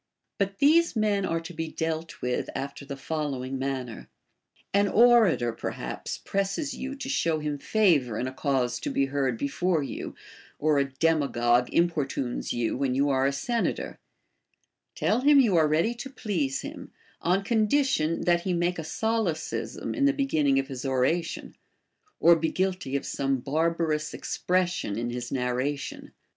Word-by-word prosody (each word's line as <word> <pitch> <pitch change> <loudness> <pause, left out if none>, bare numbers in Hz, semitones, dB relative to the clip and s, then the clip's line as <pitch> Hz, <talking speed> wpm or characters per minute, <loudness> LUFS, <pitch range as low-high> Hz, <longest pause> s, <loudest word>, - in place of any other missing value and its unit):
But 195 0 -1
these 325 +5 +4
men 210 -3 +1
are 165 - 0
to 170 +2 -9
be 165 0 -3
dealt 160 0 -4
with 125 0 -1
after 140 +1 -5
the 140 -1 -6
following 135 -3 -3
manner. 130 -4 -4 0.6
An 200 +1 +4
orator 215 - +5
perhaps - - -5
presses 195 +9 -2
you 270 +2 -5
to 270 -1 -6
show 170 - +1
him 150 -1 -3
favor 150 - +2
in 125 - -1
a 130 - -5
cause 130 -3 0
to - - -3
be 140 - +1
heard 135 -4 0
before 155 +5 0
you, - - -6 0.4
or 150 -1 +2
a 140 - +2
demagogue 125 -5 +2
importunes 145 -7 0
you 120 -2 -1
when 130 -1 0
you 140 +1 +2
are 135 0 +2
a - - +1
sen 230 - -1
ator: - - -5 1.0
tell 230 +4 +1
him 285 +1 +6
you 225 -8 +4
are 160 -2 +5
ready 160 +10 +2
to 245 +3 -7
please 175 - -2
him, - - -8 0.3
on 185 +3 +1
condition 215 - +2
that 175 -1 +2
he 185 +1 -1
make 175 0 0
a - - -3
solecism 160 - -2
in 280 - +1
the 280 - +4
beginning 155 - +2
of 135 0 0
his 130 -3 -6
oration, 135 +6 -1 0.6
or 170 0 +7
be 160 0 0
guilty 185 -7 -1
of 140 - -1
some 135 -1 0
barbarous 155 +3 -1
expression 180 - -1
in 120 +1 -2
his 120 0 -5
narration. 130 +2 -2
160 Hz, 160 wpm, -27 LUFS, 135-195 Hz, 1.0 s, or